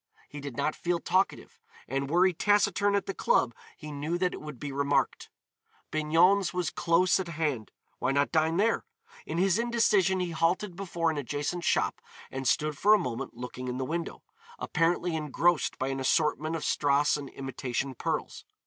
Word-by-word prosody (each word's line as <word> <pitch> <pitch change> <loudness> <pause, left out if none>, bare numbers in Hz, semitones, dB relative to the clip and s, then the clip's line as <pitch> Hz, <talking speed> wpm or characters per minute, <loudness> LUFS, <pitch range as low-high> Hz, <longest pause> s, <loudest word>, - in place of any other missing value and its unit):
He 145 - -8
did 140 -4 -7
not 155 - 0
feel 175 0 -1
talkative, 190 +3 -1 0.3
and 135 +1 -2
were 175 +4 +4
he 185 - +3
taciturn 205 +2 +2
at 200 - 0
the 195 - -3
club 125 -8 +2 0.2
he 150 -1 -8
knew 150 +4 -2
that 180 0 0
it - - -7
would 150 -5 -8
be 145 - -5
remarked. 140 +1 0 0.6
Bignon's 170 +5 +3
was 180 -3 -1
close 175 +3 +2
at 190 - -3
hand. 150 -9 -2 0.3
Why 125 - +1
not 140 +1 +1
dine 160 +1 +2
there? 225 +4 +2 0.4
In - - -3
his 190 +3 +3
indecision 215 -6 +2
he 180 -1 -2
halted 170 +3 0
before 170 -3 -1
an 150 - -3
adjacent 145 +5 -3
shop - - +1 0.3
and 135 -1 -3
stood 150 +2 +1
for 210 +2 +6
a - - +4
moment 130 - -4
looking 125 +1 -6
in 125 0 -3
the 130 - -2
window, 165 +4 -4 0.3
apparently 170 0 0
engrossed 160 +2 +1
by 130 - -2
an 135 0 -3
assortment 155 +3 +1
of 160 - -4
strass 145 0 +2
and 145 -2 -6
imitation 135 0 -4
pearls. - - -3
160 Hz, 180 wpm, -29 LUFS, 140-180 Hz, 0.6 s, for